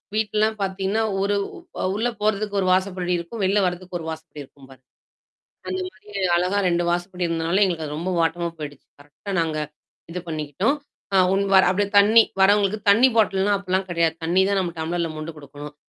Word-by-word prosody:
வீட்லலாம் 215 0 +1
பார்த்தீங்கன்னா, 195 +2 -1 0.2
ஒரு 200 +1 +1 0.5
அ - - -1
உள்ள 225 +3 0
போறதுக்கு 210 -1 0
ஒரு 185 - 0
வாசைப்படி 185 -1 -1
இருக்கும். 170 +6 -6
வெளில 195 +2 +3
வர்றதுக்கு 180 0 -3
ஒரு 160 - -8
வாசப்படி 160 -1 -9
இருக்கும் 135 0 -18
பாருங்க. 130 -1 -17 0.8
அந்த 375 - -2
மாரி 245 - -21 0.3
அழகா 180 +3 +1
2 175 0 +1
வாசபடி 175 +1 -2
இருந்தனால 165 +3 0
எங்களுக்கு 170 -4 -2
அது 150 0 -5
ரொம்ப 180 +3 -2
வாட்டமா 170 +1 0
போயிடுச்சு. 145 -2 -8
கரெக்ட்டா 145 +7 -11
நாங்க 160 -2 -1 0.5
இது 180 +1 -4
பண்ணிக்கிட்டோம். 155 - -1 0.4
அ - - +5 0.2
உன் 195 +1 +2
வர் 190 - +7
அப்டியே 200 +1 0
தண்ணி 220 +3 +7 0.2
வர்றவங்களுக்கு 205 +1 +3
தண்ணி 235 +6 +6
பாட்டில்லாம் 200 -1 +3
அப்பலாம் 190 0 -1
கிடையாது. 165 -1 +1
தண்ணி 180 +3 +3
தான் 200 - +1
நம்ம 175 -2 -2
டம்ளர்ல 165 +1 -2
மொண்டு 155 +1 -6
குடுக்கணும். 145 +1 -10
185 Hz, 175 wpm, -23 LUFS, 165-200 Hz, 0.8 s, வர்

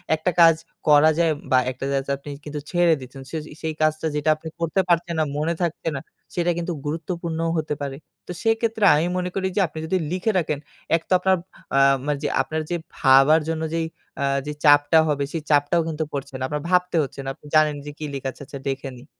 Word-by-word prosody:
একটা 170 +3 -1
কাজ 165 -1 +8 0.3
করা 150 +1 +7
যায় 165 -2 +3 0.2
বা 130 - +6
একটা 130 +1 -6
যা 140 - +1
যায় 140 - +1
আপনি 145 +1 -11 0.2
কিন্তু 150 0 -5
ছেড়ে 175 -2 +4
দিচ্ছেন। 130 +1 -10
সে 160 - -2 0.2
সেই 160 -1 -2
কাজটা 155 +1 +1
যেটা 150 +1 0
আপনি 155 +1 -10
করতে 170 +3 +1
পারছেন 170 0 +2
না, 155 - +4
মনে 160 +3 0
থাকছে 170 -1 -2
না - - -2 0.4
সেটা 175 0 +1
কিন্তু 175 0 -2
গুরুত্বপূর্ণও 165 +1 -3
হতে 155 -1 -1
পারে। 140 -1 -3 0.3
তো - - -5
সেক্ষেত্রে 225 -1 +1
আমি 155 - +2
মনে 180 0 -1
করি 190 -1 0
যে, - - +2
আপনি 160 - -8
যদি 185 +4 +1
লিখে 185 +5 0
রাখেন 150 -4 -2 0.4
এক 165 - 0
তো - - -27
আপনার 190 +1 +3 0.4
আ - - +6 0.3
মা 150 - +1
যে - - +1
আপনার 155 0 -3
যে 175 - 0 0.2
ভাবার 135 +3 +6
জন্য 160 -1 -2
যে 165 - 0 0.4
আ - - +1 0.2
যে 150 - -3
চাপটা 145 +1 +6
হবে 145 -2 0
সেই 165 - -2
চাপটাও 145 +3 +3
কিন্তু 160 0 -2
পড়ছে 140 -1 -5
না। 130 - -3
আপনার 150 +1 -3
ভাবতে 180 -1 +2
হচ্ছে 140 - -8
না। 135 - -4
আপনি 150 - -22
জানেন 155 -1 +4
যে 145 - -6
কি 155 - -5
লিখা 135 -1 -3
আছে - - -17
আচ্ছা 140 0 -8
দেখে 135 0 -3
নিই। 125 - -14
155 Hz, 220 wpm, -23 LUFS, 145-170 Hz, 0.4 s, কাজ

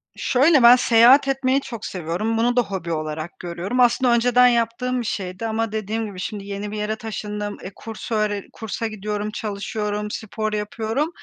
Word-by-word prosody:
Şöyle, 275 +1 +3
ben 240 +1 +10
seyahat 250 +3 +6
etmeyi 270 0 +1
çok 230 -5 -7
seviyorum, 185 +6 -2
bunu 240 +2 +2
da 245 - +5
hobi 190 -6 -5
olarak 155 +1 -4
görüyorum. 180 +7 -4
Aslında 245 0 +4
önceden 245 +1 +5
yaptığım 245 +1 0
bir - - -6
şeydi 195 0 -4
ama 225 0 -1
dediğim 220 +1 -2
gibi 200 -3 -8
şimdi 200 +1 -5
yeni 200 +1 -5
bir 215 - -5
yere 210 +1 -2
taşındım, 210 -1 -5
eee, 190 - -7
kurs 225 +1 -8
öğre 210 -2 0
kursa 225 +1 -4
gidiyorum, 210 0 -4
çalışıyorum, 210 0 -3
spor 215 0 -4
yapıyorum. 220 +7 -2
220 Hz, 170 wpm, -22 LUFS, 205-235 Hz, -, ben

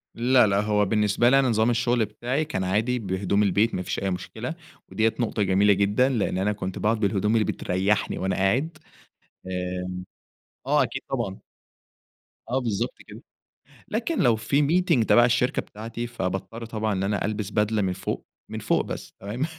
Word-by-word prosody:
لا، 125 0 +4
لا 100 0 +2
هو 105 -1 +2
بالنِّسبة 105 +3 +2
لي 135 +2 +5
أنا 135 -2 +2
نظام 110 0 +2
الشُّغل 120 -1 +2
بتاعي، 125 +8 -2
كان 145 -11 -3
عادي 110 +7 0
بهدوم 100 0 0
البيت 105 +3 +2
ما 90 - -2
فيش 90 - -3
أي 95 - -1
مشكلة، 110 - -5 0.4
ودِيَّة 110 0 +2
نُقطة 110 -3 0
جميلة 100 +2 +4
جدًا، 100 +6 +2
لإن 115 -7 0
أنا 100 +3 +1
كُنت 95 -2 -5
باقعُد 110 +1 +1
بالهدوم 105 0 +1
اللي 110 -2 +3
بتريَّحني 95 +4 0
وأنا 95 0 -1
قاعد، 130 - 0 0.7
آآ 90 0 -4 0.7
آه، - - +4
أكيد - - -3
طبعًا. 115 -7 -3 1.1
آه، 130 +2 +1
بالضبط 115 -6 -2
كده، - - -11 0.7
لكن 240 +9 -2
لو 120 -4 +4
في 110 +7 +1
Meeting 165 -8 +3
تبع 120 +2 +6
الشَّركة 125 +1 +1
بتاعتي، 115 +3 -7
فباضطر 115 +1 -4
طبعًا 110 -1 -2
إن 95 0 -1
أنا 100 0 0
ألبس 105 -1 -3
بدلة 105 +1 +1
من 95 -2 0
فوق، 95 - -4 0.3
من - - -4
فوق - - +1
بس - - -7
تمام. 110 +9 -2
105 Hz, 170 wpm, -25 LUFS, 95-120 Hz, 1.1 s, تبع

